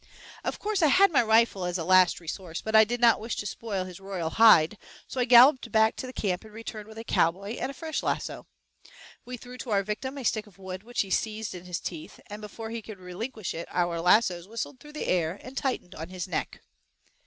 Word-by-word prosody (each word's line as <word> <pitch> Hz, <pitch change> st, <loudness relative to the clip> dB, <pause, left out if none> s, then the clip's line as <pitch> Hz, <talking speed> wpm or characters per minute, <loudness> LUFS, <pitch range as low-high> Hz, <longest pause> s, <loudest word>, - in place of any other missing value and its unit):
Of -, -, -3 dB
course 415 Hz, -2 st, -1 dB
I 315 Hz, -, +5 dB
had 385 Hz, +6 st, +5 dB
my 280 Hz, -, +4 dB
rifle 220 Hz, -3 st, +3 dB
as 180 Hz, 0 st, -1 dB
a 165 Hz, -, -3 dB
last 185 Hz, 0 st, +5 dB
resource, 170 Hz, 0 st, -6 dB
but 220 Hz, 0 st, -2 dB
I 220 Hz, -, +9 dB
did 240 Hz, +3 st, -2 dB
not 235 Hz, -1 st, +5 dB
wish 225 Hz, +2 st, -4 dB
to -, -, -4 dB
spoil 205 Hz, -3 st, -3 dB
his 185 Hz, -1 st, -10 dB
royal 190 Hz, -4 st, -4 dB
hide, 215 Hz, -4 st, +6 dB, 0.3 s
so 260 Hz, -, -5 dB
I 250 Hz, -, +3 dB
galloped 250 Hz, 0 st, +6 dB
back 220 Hz, 0 st, +4 dB
to 260 Hz, -, -5 dB
the -, -, -7 dB
camp 195 Hz, -6 st, -2 dB
and 220 Hz, -, -14 dB
returned 215 Hz, -1 st, -8 dB
with 220 Hz, 0 st, -13 dB
a 225 Hz, -, -6 dB
cowboy 200 Hz, +3 st, 0 dB
and -, -, -2 dB
a -, -, -6 dB
fresh 315 Hz, +3 st, -3 dB
lasso. -, -, -3 dB, 0.8 s
We 250 Hz, 0 st, -6 dB
threw 250 Hz, +1 st, -11 dB
to 245 Hz, -, -7 dB
our 200 Hz, -2 st, +2 dB
victim 235 Hz, +7 st, -4 dB
a 270 Hz, -, -5 dB
stick 215 Hz, -1 st, 0 dB
of 195 Hz, -, -19 dB
wood 190 Hz, -1 st, -7 dB
which 240 Hz, +3 st, -2 dB
he 195 Hz, -, -5 dB
seized 220 Hz, +1 st, -1 dB
in 180 Hz, 0 st, -9 dB
his 180 Hz, -1 st, -4 dB
teeth, 160 Hz, -3 st, -7 dB
and 210 Hz, +1 st, -7 dB
before 220 Hz, +2 st, -7 dB
he 230 Hz, 0 st, -4 dB
could 215 Hz, -1 st, -10 dB
relinquish 205 Hz, +4 st, -5 dB
it 170 Hz, -, -6 dB
our 175 Hz, -2 st, -1 dB
lassoes 180 Hz, -1 st, +3 dB
whistled 230 Hz, +4 st, -5 dB
through 295 Hz, +2 st, -14 dB
the 305 Hz, -, -4 dB
air 175 Hz, +1 st, 0 dB
and 255 Hz, +1 st, -10 dB
tightened 260 Hz, -10 st, -2 dB
on 160 Hz, +2 st, -7 dB
his 185 Hz, -1 st, -5 dB
neck. -, -, -4 dB
215 Hz, 235 wpm, -27 LUFS, 185-235 Hz, 0.8 s, I